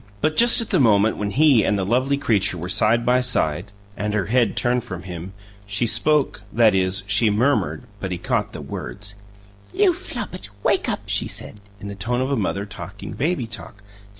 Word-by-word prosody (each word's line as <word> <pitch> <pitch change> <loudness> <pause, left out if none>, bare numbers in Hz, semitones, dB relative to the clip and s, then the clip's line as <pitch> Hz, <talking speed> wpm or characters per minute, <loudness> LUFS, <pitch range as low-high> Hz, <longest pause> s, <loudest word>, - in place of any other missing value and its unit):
But 155 +4 0
just 235 +4 +6
at 230 - -6
the 185 - +3
moment 110 -3 +3
when 105 -1 -2
he 135 -1 +4
and 105 - +1
the 95 - -1
lovely 130 +6 +1
creature 100 -9 +1
were 90 +2 -5
side 110 +5 +3
by 125 +1 +3
side, 100 -6 0 0.2
and 105 0 -2
her 105 - 0
head 120 +1 +1
turned 125 0 +1
from 90 -1 -7
him, 90 0 -8 0.3
she 100 +4 0
spoke 130 +1 +2
that 110 -1 +4
is, 95 0 0
she 100 +3 +3
murmured, 125 +5 +1 0.2
but 95 -2 -4
he 90 - -2
caught - - -1
the - - -8
words. 105 0 -6 0.6
"You 395 -3 +4
Flopit, 215 - -7
wake - - +2
up!" - - -2
she - - 0
said, 105 - -5 0.2
in 100 - -8
the 100 - -5
tone 120 +5 -2
of 130 +2 -1
a - - +2
mother 100 -3 -2
talking 100 0 -9
baby 150 -2 -1
talk. 105 -2 -9
110 Hz, 200 wpm, -22 LUFS, 100-130 Hz, 0.6 s, just